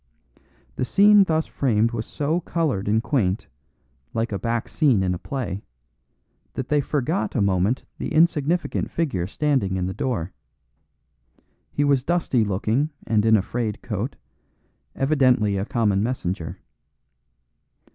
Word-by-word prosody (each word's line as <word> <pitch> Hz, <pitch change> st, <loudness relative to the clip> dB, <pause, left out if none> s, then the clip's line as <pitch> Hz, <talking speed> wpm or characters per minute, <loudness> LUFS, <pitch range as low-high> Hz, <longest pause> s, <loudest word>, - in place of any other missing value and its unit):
The -, -, 0 dB
scene 205 Hz, +7 st, +6 dB
thus 160 Hz, -2 st, +1 dB
framed 115 Hz, -4 st, +1 dB
was 115 Hz, -2 st, -4 dB
so 155 Hz, +4 st, -1 dB
coloured 155 Hz, -, -1 dB
and 110 Hz, +2 st, +2 dB
quaint, 110 Hz, -10 st, 0 dB, 0.7 s
like 115 Hz, 0 st, -1 dB
a 100 Hz, -, -2 dB
back 115 Hz, +3 st, -1 dB
scene 130 Hz, -11 st, +2 dB
in 90 Hz, -1 st, +1 dB
a 90 Hz, -, -4 dB
play, 110 Hz, -5 st, -4 dB, 0.9 s
that 130 Hz, -, -4 dB
they 150 Hz, -1 st, +3 dB
forgot 150 Hz, +6 st, -1 dB
a -, -, +2 dB
moment 100 Hz, +4 st, +1 dB, 0.2 s
the -, -, -4 dB
insignificant 165 Hz, +1 st, +1 dB
figure 115 Hz, -, -1 dB
standing 130 Hz, -6 st, 0 dB
in 90 Hz, -, -1 dB
the 95 Hz, -, -3 dB
door. 100 Hz, -10 st, -2 dB, 1.4 s
He 145 Hz, -, 0 dB
was 140 Hz, -3 st, +2 dB
dusty 160 Hz, -7 st, +1 dB
looking 110 Hz, +8 st, 0 dB, 0.2 s
and 110 Hz, -2 st, +2 dB
in 110 Hz, 0 st, +6 dB
a 95 Hz, -, 0 dB
frayed 115 Hz, -1 st, -3 dB
coat, -, -, -3 dB, 0.8 s
evidently 130 Hz, -7 st, +2 dB
a 95 Hz, +1 st, -1 dB
common 105 Hz, -4 st, +1 dB
messenger. 95 Hz, -7 st, -3 dB
120 Hz, 135 wpm, -23 LUFS, 100-145 Hz, 1.4 s, scene